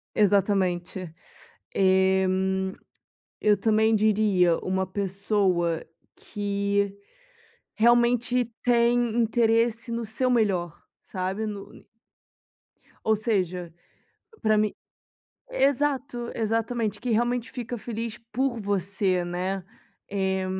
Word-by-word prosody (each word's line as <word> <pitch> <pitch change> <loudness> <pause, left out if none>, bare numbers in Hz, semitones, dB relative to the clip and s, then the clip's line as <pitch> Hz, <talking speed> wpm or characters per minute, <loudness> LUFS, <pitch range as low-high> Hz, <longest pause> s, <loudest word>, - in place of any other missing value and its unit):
Exatamente. 190 -4 +1 0.6
Eh, 190 0 +3 1.2
eu 210 -1 +4
também 220 +2 +3
diria, 205 -5 +3
uma 190 0 -1
pessoa 190 -3 0 0.3
que 200 -1 -1 0.8
realmente 240 +2 +3 0.2
tem 240 -1 +3
interesse 230 0 +2
no 230 0 -2
seu 235 +4 -1
melhor, 195 -9 +1 0.2
sabe. 190 +3 -3
No 205 -2 -8 1.2
Ou 220 - +3
seja, 185 -6 -1 0.7
pra 215 -2 +3
mi 210 -1 +1 0.7
exato. 275 - 0
Exatamente, 225 -1 -1
que 250 - -4
realmente 240 +2 0
fica 245 -1 -5
feliz 230 0 -5
por 250 +1 0
você, 195 -2 0
né. 185 +2 -3 0.5
Eh, 190 -1 0
210 Hz, 85 wpm, -26 LUFS, 190-235 Hz, 1.2 s, eu